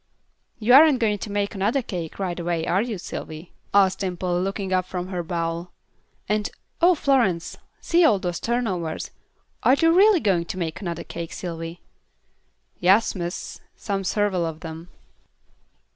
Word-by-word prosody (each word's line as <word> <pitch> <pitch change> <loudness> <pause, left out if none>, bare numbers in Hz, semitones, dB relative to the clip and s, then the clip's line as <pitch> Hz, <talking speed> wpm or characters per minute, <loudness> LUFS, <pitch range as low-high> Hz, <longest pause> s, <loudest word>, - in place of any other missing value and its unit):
"You 230 +3 +3
aren't 295 0 +8
going 215 -4 +1
to 210 - -6
make 205 +1 -1
another 215 +7 0
cake 175 -7 -5
right 180 -3 -3
away, 170 -1 -1
are 190 +3 +2
you, 225 -2 -3
Sylvy?" 160 -1 -8 0.2
asked 195 -1 +4
Dimple, 180 -2 -1
looking 195 0 -2
up 185 0 +1
from 180 0 -4
her 180 -2 -2
bowl. 170 0 -3 0.6
"And 210 0 0 0.3
oh, 355 +1 +6
Florence, 235 - +1 0.3
see 345 +1 +3
all 220 -11 +5
those 175 -2 -3
turnovers. 195 -10 -2 0.5
Are 255 - +5
you 330 +3 +3
really 400 0 +6
going 185 - +1
to 185 - -6
make 165 -3 -3
another 170 -4 -4
cake, 170 -1 -7
Sylvy?" 165 -1 -6 1.0
"Yass, 195 +5 +4
miss, 175 -1 -5
some 200 -2 -3
suveral 195 -2 0
of 160 0 -9
'em." 165 +2 -8
185 Hz, 155 wpm, -24 LUFS, 170-215 Hz, 1.0 s, aren't